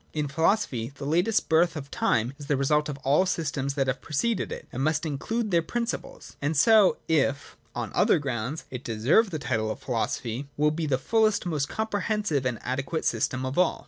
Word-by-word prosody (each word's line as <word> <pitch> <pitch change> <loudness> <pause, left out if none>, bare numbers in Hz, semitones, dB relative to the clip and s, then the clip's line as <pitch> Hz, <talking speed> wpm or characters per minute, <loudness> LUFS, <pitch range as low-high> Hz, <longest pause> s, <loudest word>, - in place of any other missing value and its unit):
In 150 -1 -1
philosophy 140 - 0
I - - -23
the 140 - -6
latest 175 +9 +1
birth 165 +1 +3
of 140 -2 -7
time 115 +4 +1
is 145 - -9
the 145 - +1
result 150 +2 +1
of 140 - -4
all 140 +2 +3
the 185 - +3
systems 140 -6 -2
that 135 -2 +1
have 130 0 -2
preceded 210 +10 -1
it, - - -7
and 130 - -3
must 155 +2 +1
include 210 +10 -2
their 170 -1 +4
principles; 235 +7 -5
and 145 +2 0
so, 215 +5 +6
if, 140 -3 0 0.2
on 120 -4 -3
other - - +4
grounds, 135 0 -3
it 125 0 -6
deserve 120 - +3
the 165 - -3
title 115 -6 -1
of 110 - -3
philo 120 -4 -1
sophy, 120 +4 -4
will 150 +1 +3
be 155 0 -2
the 135 -3 +2
fullest, 215 - +2
most 150 -5 -1
comprehensive, 210 - -1
and 125 - -1
most - - -14
adequate 135 +5 -2
system 130 +3 0
of 130 +6 -2
all. 180 - +2
145 Hz, 210 wpm, -26 LUFS, 130-175 Hz, 0.2 s, so